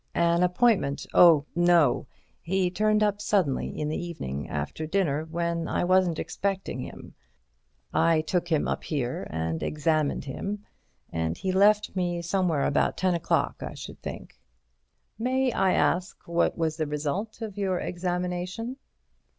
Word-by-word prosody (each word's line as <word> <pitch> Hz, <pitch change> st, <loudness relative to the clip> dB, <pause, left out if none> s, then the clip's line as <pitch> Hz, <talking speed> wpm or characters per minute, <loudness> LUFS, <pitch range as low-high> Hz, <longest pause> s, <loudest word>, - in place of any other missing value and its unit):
"An 170 Hz, 0 st, +3 dB
appointment? 180 Hz, -, +2 dB
Oh, 165 Hz, -5 st, +7 dB
no! 175 Hz, -5 st, +4 dB, 0.3 s
He 185 Hz, +1 st, 0 dB
turned 215 Hz, +2 st, +2 dB
up 205 Hz, -1 st, +1 dB
suddenly 180 Hz, -12 st, +1 dB
in 150 Hz, -, -1 dB
the 155 Hz, +3 st, -2 dB
evening 75 Hz, -, -5 dB
after 75 Hz, -, -4 dB
dinner 160 Hz, -4 st, 0 dB
when 170 Hz, 0 st, -2 dB
I -, -, 0 dB
wasn't 180 Hz, -2 st, +3 dB
expecting 195 Hz, -9 st, -3 dB
him. -, -, -8 dB, 0.8 s
I 165 Hz, -1 st, +3 dB
took 175 Hz, +2 st, -1 dB
him 160 Hz, -3 st, +1 dB
up -, -, -2 dB
here 130 Hz, -6 st, -3 dB
and 80 Hz, 0 st, -2 dB
examined 155 Hz, -1 st, 0 dB
him, 200 Hz, +9 st, -5 dB, 0.5 s
and 80 Hz, 0 st, -2 dB
he 190 Hz, -, -2 dB
left 205 Hz, +2 st, +3 dB
me 175 Hz, -2 st, -1 dB
somewhere 175 Hz, -4 st, +1 dB
about 145 Hz, -, +1 dB
ten 185 Hz, -1 st, +2 dB
o'clock, 170 Hz, -, 0 dB
I -, -, -6 dB
should -, -, -9 dB
think." -, -, -8 dB, 0.8 s
"May 260 Hz, +2 st, +1 dB
I 190 Hz, -4 st, +2 dB
ask 180 Hz, +1 st, 0 dB
what 170 Hz, 0 st, +1 dB
was 160 Hz, -2 st, -1 dB
the 155 Hz, -2 st, -1 dB
result 155 Hz, +10 st, -3 dB
of 210 Hz, -3 st, -6 dB
your 190 Hz, -3 st, 0 dB
examination?" 180 Hz, +6 st, -3 dB
175 Hz, 145 wpm, -27 LUFS, 155-190 Hz, 0.8 s, Oh